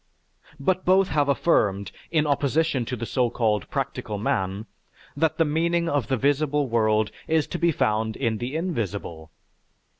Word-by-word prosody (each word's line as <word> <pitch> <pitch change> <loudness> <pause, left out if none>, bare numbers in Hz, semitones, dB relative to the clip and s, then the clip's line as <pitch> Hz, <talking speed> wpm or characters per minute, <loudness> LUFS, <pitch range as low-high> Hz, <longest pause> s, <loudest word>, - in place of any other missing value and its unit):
But 185 +6 0
both 190 +1 +4
have 145 -2 +1
affirmed, 100 - +1 0.2
in 155 -2 +2
opposition 145 -1 +1
to 125 - -3
the 115 -1 -5
so 125 0 +1
called 110 -4 0
practical 105 - -3
man, 100 0 -1 0.5
that 160 +2 +1
the 165 - +3
meaning 170 +3 +1
of 145 -8 0
the 130 - 0
visible 145 +2 +1
world 110 -2 +2 0.2
is 160 -1 +2
to 175 - -4
be 170 -1 +3
found 110 -5 0
in 115 -5 -1
the 125 +5 -4
invisible. 100 - -3
135 Hz, 155 wpm, -25 LUFS, 110-160 Hz, 0.5 s, both